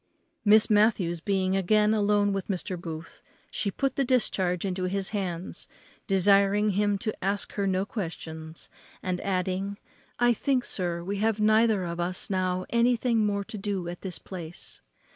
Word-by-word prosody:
Miss 215 Hz, +1 st, +6 dB
Matthews 205 Hz, -6 st, +3 dB
being 190 Hz, +1 st, 0 dB
again 210 Hz, +3 st, +3 dB
alone 205 Hz, -1 st, +2 dB
with 195 Hz, -1 st, -3 dB
Mr. 185 Hz, -1 st, -2 dB
Booth, 165 Hz, -2 st, -8 dB, 0.3 s
she 200 Hz, -, -1 dB
put 270 Hz, +6 st, -2 dB
the 275 Hz, -, +3 dB
discharge 195 Hz, -8 st, +1 dB
into 185 Hz, -1 st, -2 dB
his 195 Hz, +1 st, -1 dB
hands, 185 Hz, -4 st, -4 dB, 0.4 s
desiring 200 Hz, +2 st, +4 dB
him 205 Hz, +1 st, +1 dB
to 215 Hz, +2 st, -2 dB
ask 200 Hz, +1 st, -1 dB
her 200 Hz, -1 st, -1 dB
no 190 Hz, 0 st, +1 dB
questions; 160 Hz, -5 st, -6 dB, 0.4 s
and 180 Hz, -1 st, -2 dB
adding, 190 Hz, +1 st, -1 dB, 0.4 s
"I 240 Hz, 0 st, +4 dB
think, 255 Hz, +2 st, 0 dB
sir, 175 Hz, -2 st, -1 dB
we 200 Hz, +3 st, -3 dB
have 220 Hz, 0 st, +1 dB
neither 215 Hz, -1 st, +4 dB
of 170 Hz, 0 st, -4 dB
us 180 Hz, +3 st, -2 dB
now 185 Hz, -1 st, 0 dB
anything 235 Hz, -2 st, +3 dB
more 200 Hz, -1 st, -1 dB
to 210 Hz, +1 st, -8 dB
do 195 Hz, -3 st, -3 dB
at 175 Hz, 0 st, -6 dB
this 185 Hz, -3 st, -4 dB
place." 175 Hz, -3 st, -9 dB
195 Hz, 160 wpm, -27 LUFS, 180-210 Hz, 0.4 s, Miss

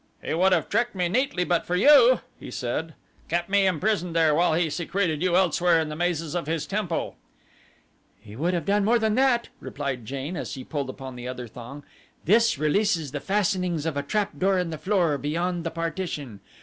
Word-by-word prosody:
"He -, -, -4 dB
would 185 Hz, +4 st, +3 dB
have 170 Hz, -5 st, +2 dB
tricked 235 Hz, +1 st, 0 dB
me 180 Hz, -2 st, 0 dB
neatly 225 Hz, -3 st, +1 dB
but 175 Hz, -1 st, +1 dB
for 180 Hz, -, -2 dB
you," 255 Hz, +3 st, +6 dB, 0.2 s
he -, -, -9 dB
said; 130 Hz, +6 st, -4 dB, 0.3 s
"kept 175 Hz, +2 st, -1 dB
me 200 Hz, -1 st, +3 dB
imprisoned 180 Hz, -1 st, 0 dB
there 160 Hz, -2 st, +4 dB
while 165 Hz, +1 st, +3 dB
he 170 Hz, 0 st, +2 dB
secreted 170 Hz, -1 st, -1 dB
you 180 Hz, -1 st, +2 dB
elsewhere 175 Hz, -2 st, +3 dB
in 160 Hz, -1 st, -2 dB
the 150 Hz, -, -5 dB
mazes 165 Hz, -2 st, -1 dB
of 170 Hz, -4 st, -3 dB
his 160 Hz, -1 st, -1 dB
temple." 195 Hz, -4 st, -3 dB, 1.0 s
"He 105 Hz, 0 st, -13 dB
would 170 Hz, +8 st, 0 dB
have 170 Hz, -4 st, -2 dB
done 205 Hz, +1 st, +2 dB
more 230 Hz, +4 st, +4 dB
than 220 Hz, -2 st, +1 dB
that," 250 Hz, -1 st, +2 dB
replied 130 Hz, -5 st, -5 dB
Jane, 140 Hz, +6 st, -4 dB
as -, -, -4 dB
she 130 Hz, -, -6 dB
pulled 140 Hz, -3 st, -4 dB
upon 130 Hz, -1 st, -8 dB
the 125 Hz, 0 st, -7 dB
other 125 Hz, -1 st, -6 dB
thong. 125 Hz, +5 st, -10 dB, 0.4 s
"This 230 Hz, +3 st, +4 dB
releases 160 Hz, 0 st, +1 dB
the 145 Hz, -, -3 dB
fastenings 185 Hz, -4 st, 0 dB
of 165 Hz, -3 st, -2 dB
a 140 Hz, -, 0 dB
trapdoor 195 Hz, +3 st, 0 dB
in 180 Hz, -2 st, -1 dB
the 160 Hz, -, -6 dB
floor 175 Hz, -8 st, +1 dB
beyond 170 Hz, +5 st, -2 dB
the 165 Hz, -, -2 dB
partition. 165 Hz, -, -4 dB
170 Hz, 200 wpm, -25 LUFS, 150-195 Hz, 1.0 s, you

